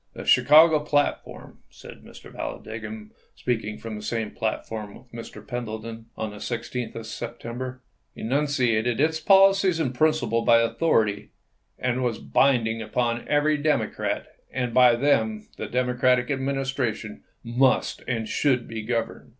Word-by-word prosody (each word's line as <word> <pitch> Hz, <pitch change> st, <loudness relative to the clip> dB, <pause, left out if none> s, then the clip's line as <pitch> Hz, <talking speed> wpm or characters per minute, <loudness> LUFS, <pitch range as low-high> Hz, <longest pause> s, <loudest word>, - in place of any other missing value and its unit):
" -, -, -46 dB
The -, -, -8 dB
Chicago 155 Hz, +1 st, +6 dB
platform," 145 Hz, -1 st, -2 dB
said -, -, -13 dB
Mr. -, -, -13 dB
Vallan -, -, -5 dB
digham, 110 Hz, -1 st, -7 dB, 0.2 s
speaking 110 Hz, -3 st, -2 dB
from 115 Hz, -1 st, -7 dB
the 105 Hz, -, -7 dB
same 110 Hz, 0 st, -3 dB
platform 110 Hz, -2 st, -4 dB
with 125 Hz, -, -17 dB
Mr. 115 Hz, -2 st, -10 dB
Pendleton 115 Hz, -1 st, -6 dB
on 110 Hz, -1 st, -3 dB
the 105 Hz, -, -10 dB
16th 120 Hz, +2 st, -4 dB
of 115 Hz, -, -6 dB
September, 120 Hz, +3 st, -6 dB, 0.2 s
" -, -, -46 dB
enunciated 125 Hz, -3 st, 0 dB
its 160 Hz, +2 st, +2 dB
policy 195 Hz, -1 st, +5 dB
and 135 Hz, -6 st, -1 dB
principles 125 Hz, -5 st, +1 dB
by 115 Hz, -, +6 dB
authority 115 Hz, -4 st, +1 dB, 0.5 s
and 125 Hz, 0 st, -1 dB
was 120 Hz, -3 st, -1 dB
bind 130 Hz, -5 st, +2 dB
ing 115 Hz, 0 st, -3 dB
upon 120 Hz, +2 st, -2 dB
every 150 Hz, +1 st, +2 dB
Democrat, 150 Hz, 0 st, -1 dB, 0.3 s
and 125 Hz, -2 st, -2 dB
by 125 Hz, -1 st, +6 dB
them 110 Hz, -5 st, +1 dB
the 110 Hz, -, -4 dB
Demo 125 Hz, +2 st, 0 dB
cratic 125 Hz, +1 st, +2 dB
Administration 135 Hz, -5 st, -2 dB, 0.2 s
must 125 Hz, +2 st, +1 dB
and 115 Hz, -3 st, -2 dB
should 125 Hz, 0 st, +1 dB
be 115 Hz, -1 st, -5 dB
governed. 115 Hz, +1 st, -3 dB
120 Hz, 150 wpm, -25 LUFS, 110-135 Hz, 0.5 s, Chicago